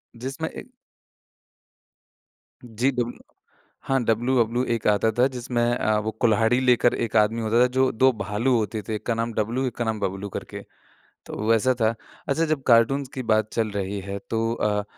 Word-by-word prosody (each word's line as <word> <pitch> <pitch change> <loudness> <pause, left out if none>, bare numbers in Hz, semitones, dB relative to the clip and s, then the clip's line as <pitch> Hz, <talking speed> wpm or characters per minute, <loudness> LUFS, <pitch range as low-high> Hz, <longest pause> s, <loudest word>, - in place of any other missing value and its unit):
जिसमें 135 +6 -5
एक - - -10 2.0
जी, 120 +3 0
डब्ल 120 -2 -2 0.7
हाँ, 135 -2 +1
डब्लू-बबलू 120 +1 +1
एक 115 - -3
आता 105 +1 +3
था, 125 - +5
जिसमें 125 -2 -2
अ, 110 -3 +1
वो 110 +1 -3
कुल्हाड़ी 115 +2 +3
लेकर 125 -1 +3
1 115 - -3
आदमी 110 +2 +2
होता 115 +2 +2
था, 125 - +5
जो 130 +1 +1
2 130 +3 +4
भालू 115 +3 0
होते 110 0 -2
थे, 110 - -1
एक 105 - -7
का 120 - +1
नाम 115 0 -2
डब्लू, 115 +5 -1
एक 120 - -5
का 120 - -1
नाम 110 -1 -2
बबलू 95 +1 -3
करके। - - -7 0.6
तो - - -9
वो 105 +2 -2
वैसा 115 +3 +3
था। 110 +1 +3 0.4
अच्छा, 160 +4 +2
जब 155 -3 -1
कार्टून्स 125 +3 +4
की 130 - -4
बात 110 0 +2
चल 110 -2 0
रही 100 0 -3
है, 100 +1 -5
तो 115 0 0
अ, 105 -2 0
115 Hz, 185 wpm, -24 LUFS, 110-125 Hz, 2.0 s, था